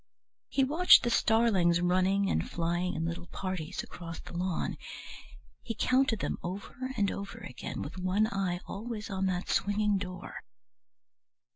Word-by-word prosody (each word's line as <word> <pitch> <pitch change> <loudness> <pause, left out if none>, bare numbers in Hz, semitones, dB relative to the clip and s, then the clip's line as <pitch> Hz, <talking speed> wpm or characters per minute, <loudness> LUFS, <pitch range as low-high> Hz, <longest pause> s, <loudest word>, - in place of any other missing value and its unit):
He 270 - +2
watched 320 +7 +7
the 240 - +1
starlings 215 -8 +4
running 185 +3 +2
and - - 0
flying 175 +2 -1
in 160 0 -1
little 170 +1 -4
parties 185 -3 -4
across 165 -2 -8
the - - -11
lawn; 180 0 -1 0.8
he 230 -2 -5
counted 255 -4 +2
them - - -2
over 205 +8 -5
and 200 -2 +2
over 200 0 -6
again, 125 - -6
with 165 +6 -7
one 185 +4 +2
eye 195 -4 -1
always 215 0 -5
on 190 0 0
that 180 -1 -1
swinging 205 0 +2
door. 185 -2 -6
190 Hz, 145 wpm, -30 LUFS, 175-215 Hz, 0.8 s, watched